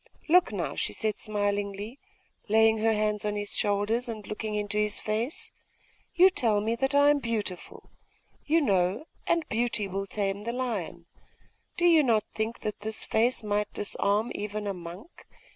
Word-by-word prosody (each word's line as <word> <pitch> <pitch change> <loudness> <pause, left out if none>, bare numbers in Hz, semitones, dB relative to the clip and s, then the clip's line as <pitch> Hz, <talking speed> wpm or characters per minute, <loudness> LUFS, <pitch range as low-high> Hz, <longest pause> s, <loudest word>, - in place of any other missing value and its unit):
'Look 360 +2 +5
now,' - - -3
she - - -2
said 215 -2 -1
smilingly, 205 +2 -2 0.5
laying 220 +1 +4
her 225 +1 +3
hands 210 -1 0
on 210 0 -1
his 205 0 0
shoulders, 210 +4 0
and 215 -3 -6
looking 215 +1 -4
into 210 0 -1
his 210 -1 +1
face.... 225 +7 -2 0.6
'You 370 +2 +7
tell 225 - +2
me 220 +3 0
that 270 +3 0
I 285 0 +6
am 290 - +2
beautiful, 220 -7 -5 0.5
you 325 +2 +3
know; 195 - +1 0.2
and 335 -2 +1
beauty 230 -2 0
will 195 +1 -4
tame 200 0 -2
the 235 +3 -4
lion. 215 -9 -3 0.7
Do 350 - +1
you 330 -3 +7
not 230 -6 +2
think 220 +2 -3
that 210 - -4
this 220 +1 -2
face 235 +2 +2
might 210 0 -1
disarm 205 +2 0
even 210 0 -4
a 200 - -1
monk? 180 - -11
215 Hz, 165 wpm, -28 LUFS, 205-235 Hz, 0.7 s, You